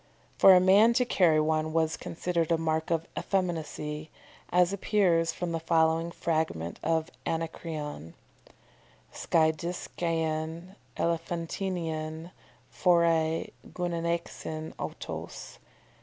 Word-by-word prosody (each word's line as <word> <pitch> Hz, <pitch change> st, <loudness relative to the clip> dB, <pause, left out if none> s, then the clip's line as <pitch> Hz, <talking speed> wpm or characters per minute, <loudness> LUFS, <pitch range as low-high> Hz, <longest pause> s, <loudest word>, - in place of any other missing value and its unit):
"] -, -, -33 dB
For 190 Hz, -, +9 dB
a -, -, +7 dB
man 200 Hz, +5 st, +6 dB
to 250 Hz, +1 st, +2 dB
carry 170 Hz, -9 st, +4 dB
one 155 Hz, 0 st, 0 dB
was 160 Hz, -1 st, +1 dB
considered 170 Hz, -1 st, -2 dB
a 165 Hz, -, +4 dB
mark 160 Hz, 0 st, -1 dB
of 165 Hz, -1 st, 0 dB
effeminacy, 160 Hz, -4 st, -2 dB, 0.4 s
as 180 Hz, +1 st, +3 dB
appears 180 Hz, -5 st, +2 dB
from 175 Hz, +1 st, -4 dB
the 165 Hz, -, -1 dB
following 165 Hz, 0 st, +2 dB
fragment 155 Hz, -, -2 dB
of 160 Hz, +1 st, 0 dB, 0.2 s
Anacreon: 160 Hz, -, -4 dB, 1.0 s
"_skiadiskaen 165 Hz, +1 st, -1 dB, 0.2 s
elephantinaen 165 Hz, -1 st, -3 dB, 0.4 s
phorei 165 Hz, -2 st, +2 dB, 0.2 s
gunaixin 170 Hz, -2 st, -3 dB
autos. -, -, -7 dB
165 Hz, 95 wpm, -29 LUFS, 160-175 Hz, 1.0 s, For